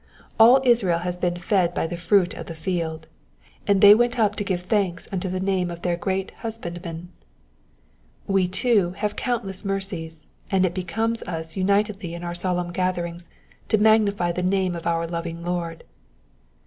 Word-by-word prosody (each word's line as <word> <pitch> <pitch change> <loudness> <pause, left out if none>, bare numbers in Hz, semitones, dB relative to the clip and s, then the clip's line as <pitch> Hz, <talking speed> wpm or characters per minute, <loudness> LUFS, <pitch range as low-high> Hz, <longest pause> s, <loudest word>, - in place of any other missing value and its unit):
All 245 +4 +8
Israel 210 -9 +3
ad 180 0 -3
been 175 -1 0
fed 175 -1 +1
by - - 0
the 170 +2 -4
fruit 175 +2 +2
of - - -8
the 165 - -7
field, 160 -2 -3 0.6
and 200 -1 +3
they 205 -1 +10
went 240 +3 +2
up 210 -3 +2
to 205 - -1
give 185 -3 -2
thanks 185 -4 -1
unto 185 -1 -2
the 185 +1 -2
name 190 -2 0
of 170 0 -8
their 175 -1 +1
great 190 +2 -2
Husbandman: 175 -6 -6 1.2
we, 195 -2 +2
too, 190 -2 +1
have 210 -1 -2
countless 220 -7 -3
mercies, 180 -6 -4 0.2
and 190 -1 +3
it 175 - -1
becomes 220 +6 -2
us 160 -2 -5
unitedly 200 -2 0
in 170 - -8
our 175 0 -4
solemn 175 0 -1
gatherings 175 -1 -2 0.4
to 215 - +4
magnify 205 -4 +3
the 180 - -3
name 185 -1 +1
of 170 - -5
our 165 0 0
loving 170 0 -5
Lord. 170 -2 -3
180 Hz, 170 wpm, -24 LUFS, 170-200 Hz, 1.2 s, they